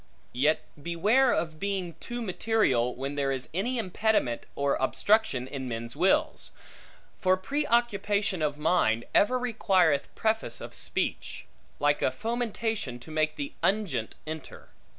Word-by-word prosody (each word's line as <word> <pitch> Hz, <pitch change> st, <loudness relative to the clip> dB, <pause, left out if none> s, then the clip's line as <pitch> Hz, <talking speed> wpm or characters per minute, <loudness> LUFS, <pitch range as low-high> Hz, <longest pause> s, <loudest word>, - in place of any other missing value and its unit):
Yet 150 Hz, +5 st, +2 dB, 0.2 s
beware 210 Hz, -, +3 dB
of 160 Hz, -1 st, -1 dB
being 195 Hz, -3 st, -2 dB
too 240 Hz, 0 st, -5 dB
material, 185 Hz, -, +1 dB
when 135 Hz, +2 st, -4 dB
there 140 Hz, -1 st, 0 dB
is 130 Hz, -1 st, -4 dB
any 235 Hz, +9 st, -1 dB
impediment 205 Hz, -, 0 dB
or 140 Hz, 0 st, +1 dB
obstruction 130 Hz, -, +2 dB
in 130 Hz, -1 st, -5 dB
men's 115 Hz, 0 st, -5 dB
wills; 185 Hz, +5 st, +1 dB, 0.7 s
for 185 Hz, 0 st, +3 dB
pre 285 Hz, +10 st, -2 dB
occupation 205 Hz, -5 st, +1 dB
of 150 Hz, -1 st, 0 dB
mind 120 Hz, -8 st, +2 dB
ever 250 Hz, +5 st, +4 dB
requireth 190 Hz, -, +2 dB
preface 220 Hz, -, 0 dB
of -, -, -8 dB
speech; -, -, -3 dB, 0.3 s
like 145 Hz, 0 st, +2 dB
a -, -, +3 dB
fomentation 225 Hz, -, -2 dB
to 140 Hz, +6 st, -12 dB
make 155 Hz, 0 st, 0 dB
the 145 Hz, -1 st, -5 dB
unguent 180 Hz, -, 0 dB
enter. 155 Hz, -1 st, -8 dB
175 Hz, 135 wpm, -28 LUFS, 140-220 Hz, 0.7 s, ever